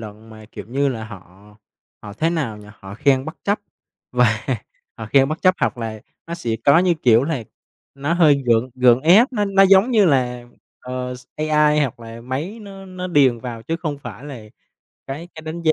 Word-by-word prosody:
luận 110 +1 -11
mà, 110 0 -13
kiểu - - -8
như 140 +3 0
là, 115 -4 -4
họ 105 0 -14 0.5
họ, 105 - -9
thế 160 +9 0
nào 145 -11 -2
nhỉ, 105 - -14
họ 95 +1 -9
khen 135 +1 +2
bất 160 - -7
chấp 205 +1 +1 0.5
và 120 -3 +1 0.5
họ 110 - -6
khen 135 +4 +3
bất 155 - -5
chấp, 185 0 +5
hoặc - - 0
là 110 -2 -5 0.3
nó 170 - -5
sẽ 120 -9 -5
có, 140 +3 +6
như 180 -1 +3
kiểu 120 0 +5
là, 145 -6 -2 0.5
nó 140 +3 -2
hơi 150 -5 +4
gượng 120 +2 +2
gượng 125 -1 +4
ép, 195 - +5
nó 210 -4 0
nó, 195 -1 +3
giống 195 +4 +5
như 220 -4 +4
là, 125 -5 0 0.4
ờ, 125 0 -5
s 125 0 -13
AI, 150 0 +2
hoặc 130 -5 -2
là 115 0 -10
máy 140 - -5
nó 195 -1 -11
nó 185 -1 -6
điền 140 -8 +3
vào, 115 -2 -7
chứ 165 +7 -3
không 155 -4 -4
phải 125 -2 -10
là 140 -5 -8 0.7
cái 150 +6 -7
cái 160 - -10
đánh 160 +2 -6
giá 160 -1 +3
135 Hz, 210 wpm, -20 LUFS, 115-165 Hz, 0.7 s, có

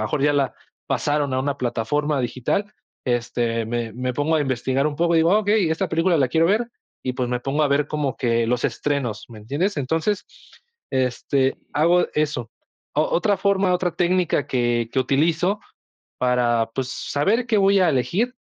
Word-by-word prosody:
mejor 140 +6 -1
ya 145 0 +4
la 140 -3 +1 0.3
pasaron 145 -2 0
a 130 - +1
una 140 +1 -1
plataforma 135 +4 -1
digital, 125 - -1 0.4
este, 120 -1 0
me 115 -1 -3
me 125 +2 -3
pongo 145 +5 0
a 155 - +2
investigar 135 +1 0
un 145 - -6
poco 170 0 +2
y - - +5
digo: 165 +2 +4
"Ah, 210 - +5
okey, 205 -5 +2
esta 160 - -1
película 165 +1 +2
la 135 - +3
quiero 160 +5 +3
ver", 225 +5 +1 0.4
y, 130 - -1
pues, 125 -1 -2
me 125 0 -1
pongo 140 +4 0
a 145 - +3
ver 140 +1 +2
como 145 -3 -2
que 115 -2 +1
los 125 0 0
estrenos, 135 -7 -2
¿me 110 -2 -11
entiendes? 150 - -2
Entonces, 160 +9 -1 0.7
este, 130 +1 0 0.2
hago 170 +4 +3
eso. 145 -6 -1 0.4
O - - +3
otra 200 +3 +1
forma, 195 -2 +2
otra 180 -1 0
técnica 175 -5 +1
que 120 -2 0
que 135 - 0
utilizo 165 +9 +1 0.6
para, 120 -2 +1
pues, 130 -1 -2
saber 205 - 0
qué 220 -3 +2
voy 195 0 +4
a 180 - +4
elegir 175 - 0
145 Hz, 180 wpm, -22 LUFS, 125-170 Hz, 0.7 s, y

